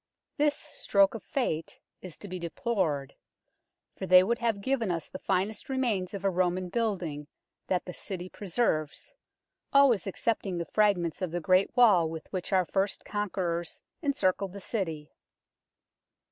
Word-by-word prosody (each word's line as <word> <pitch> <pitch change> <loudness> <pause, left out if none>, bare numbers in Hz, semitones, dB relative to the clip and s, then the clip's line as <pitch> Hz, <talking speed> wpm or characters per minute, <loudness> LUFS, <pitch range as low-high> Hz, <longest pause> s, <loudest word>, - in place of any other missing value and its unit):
This 295 0 +2
stroke 200 -7 +2
of 225 - -6
fate 200 - -2 0.2
is 185 -4 -9
to 205 - -9
be 185 -1 -5
deplored, 170 - -1 0.8
for 190 - -5
they 185 0 +8
would 235 +5 0
have 230 -4 0
given 235 -1 0
us 165 -3 -2
the 185 - -7
finest 200 +7 -1
remains 220 -8 0
of 200 0 -5
a - - +5
Roman 180 0 0
building 175 -9 -2 0.4
that 180 -1 0
the 180 - -6
City 185 -1 -5
preserves, 180 -6 -1 0.6
always 265 -9 +5
excepting 195 -2 -1
the 170 - -2
fragments 195 -5 +1
of 185 - -1
the 175 +2 -2
great 185 +6 +2
wall 195 -10 +6
with 160 -1 -6
which 185 +1 -3
our 185 -2 +3
first 195 +3 -1
conquerors 180 -5 -2 0.2
encircled 200 - 0
the 200 - -7
City. 165 -8 -4
185 Hz, 150 wpm, -29 LUFS, 175-215 Hz, 0.8 s, they